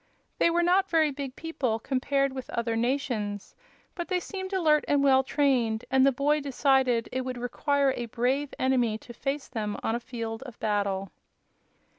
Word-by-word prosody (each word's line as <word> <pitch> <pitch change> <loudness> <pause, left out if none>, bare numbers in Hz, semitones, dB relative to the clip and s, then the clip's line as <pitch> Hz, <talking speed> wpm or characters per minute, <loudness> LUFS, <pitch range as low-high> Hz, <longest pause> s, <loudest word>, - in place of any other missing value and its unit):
They - - +5
were 345 +1 +2
not 375 +2 +3
very 315 -3 +3
big 275 -2 -6
people, 265 -9 -2
compared 275 +3 0
with 260 -1 -7
other 230 -1 -1
nations, 235 -5 -2 0.4
but 345 -3 -5
they 365 -1 0
seemed 375 +1 -6
alert 315 -6 +3
and 285 -1 +3
well 265 -1 +5
trained, 255 -6 +1
and 265 0 +5
the 275 - +6
boy 290 +4 +1
decided 265 -4 +2
it 260 - -1
would 255 -1 -4
require 275 +3 +1
a 240 - -4
brave 260 +5 0
enemy 245 -4 +1
to 240 +2 -12
face 275 +3 -3
them 210 -2 -3
on 225 - 0
a 235 - -1
field 230 -2 -5
of 250 -4 -10
battle. 200 -3 -1
265 Hz, 175 wpm, -27 LUFS, 235-285 Hz, 0.4 s, the